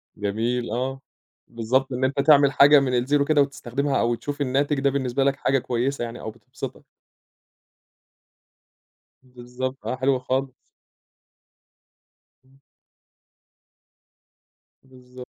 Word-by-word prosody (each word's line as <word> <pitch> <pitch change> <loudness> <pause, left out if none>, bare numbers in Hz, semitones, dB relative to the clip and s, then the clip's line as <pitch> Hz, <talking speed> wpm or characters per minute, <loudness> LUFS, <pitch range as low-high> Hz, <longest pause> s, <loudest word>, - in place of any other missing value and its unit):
جميل، 115 +4 -2
آه، 130 +3 -3 0.5
بالضبط 125 +3 -1
إن 125 +1 -3
أنت 135 +1 0
تعمل 145 -2 +5
حاجة 145 +1 +7
من 130 -2 -1
الزيرو 140 +3 +1
كده 150 -1 +3
وتستخدمها 140 0 -1
أو 120 0 +1
تشوف 145 +4 -6
الناتج 140 +2 0
ده 140 0 +2
بالنسبة 135 -1 -1
لك 140 0 +2
حاجة 135 -1 +1
كويسة 125 +2 -2
يعني 120 +1 -6
أو 110 - -6
بتبسِطك. 125 +3 -9 2.4
بالضبط 125 +1 -7
آه، - - -1
حلو 130 0 +1
خالص. 130 +1 -2 1.9
إمم. 135 +1 -25 2.3
بالضب 125 -1 -14
130 Hz, 110 wpm, -23 LUFS, 125-140 Hz, 2.4 s, حاجة